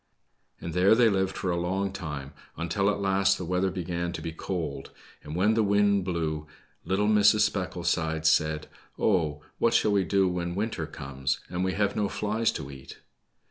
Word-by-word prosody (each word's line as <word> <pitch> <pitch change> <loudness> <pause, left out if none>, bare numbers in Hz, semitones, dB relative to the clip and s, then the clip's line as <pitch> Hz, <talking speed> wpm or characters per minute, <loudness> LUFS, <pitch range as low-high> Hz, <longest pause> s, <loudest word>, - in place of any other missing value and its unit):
And 85 - -6
there 95 +5 +5
they 120 -1 +5
lived 95 -1 0
for 90 - -1
a 85 - 0
long 95 +2 -1
time, 75 -7 -6 0.2
until 85 +5 0
at 105 - -1
last 100 0 +2
the 90 - -5
weather 90 +2 +1
began 85 -2 -3
to - - -5
be 80 - -3
cold, 80 -5 -4 0.3
and 75 +1 -7
when 100 +5 +3
the 110 - +2
wind 100 -2 +3
blew, 80 -4 -2 0.4
little 95 +4 +1
Mrs. 105 0 +5
Specklesides 85 -5 0
said, 75 -1 +2 0.3
0, 80 -8 +1 0.2
what 115 0 +3
shall 105 - +3
we 100 -2 +3
do 95 0 +2
when 90 -1 -2
winter 110 +3 -2
comes, 65 0 -3
and 90 +1 -2
we 95 0 0
have 100 -1 0
no 105 -2 0
flies 110 +2 0
to 70 -3 -6
eat 70 -1 -11
90 Hz, 180 wpm, -27 LUFS, 80-100 Hz, 0.4 s, there